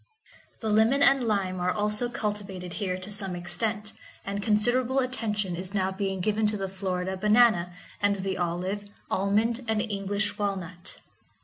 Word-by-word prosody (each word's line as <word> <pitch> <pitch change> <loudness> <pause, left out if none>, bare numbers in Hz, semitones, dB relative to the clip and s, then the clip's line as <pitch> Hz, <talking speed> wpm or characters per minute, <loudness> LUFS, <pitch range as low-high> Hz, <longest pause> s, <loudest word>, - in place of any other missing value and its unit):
The 220 - -1
lemon 225 +7 +4
and 275 -2 +6
lime 195 -5 0
are 180 0 +1
also 210 +4 0
cultivated 200 -6 -4
here 185 -2 -1
to 185 +3 -8
some 195 -3 +1
extent, 210 +4 -2 0.3
and 200 +1 -3
considerable 240 +5 +2
attention 210 -8 0
is 185 +3 -6
now 190 -1 +1
being 190 -1 -2
given 215 +2 +2
to 210 0 0
the 195 -1 -2
Florida 190 -1 -2
banana, 210 -3 +4 0.3
and 205 0 +3
the 190 -1 -2
olive, 180 +4 -2 0.2
almond, 220 +5 +1
and 220 -1 +1
English 205 -1 -2
walnut. 185 -3 -4
205 Hz, 150 wpm, -27 LUFS, 185-215 Hz, 0.3 s, and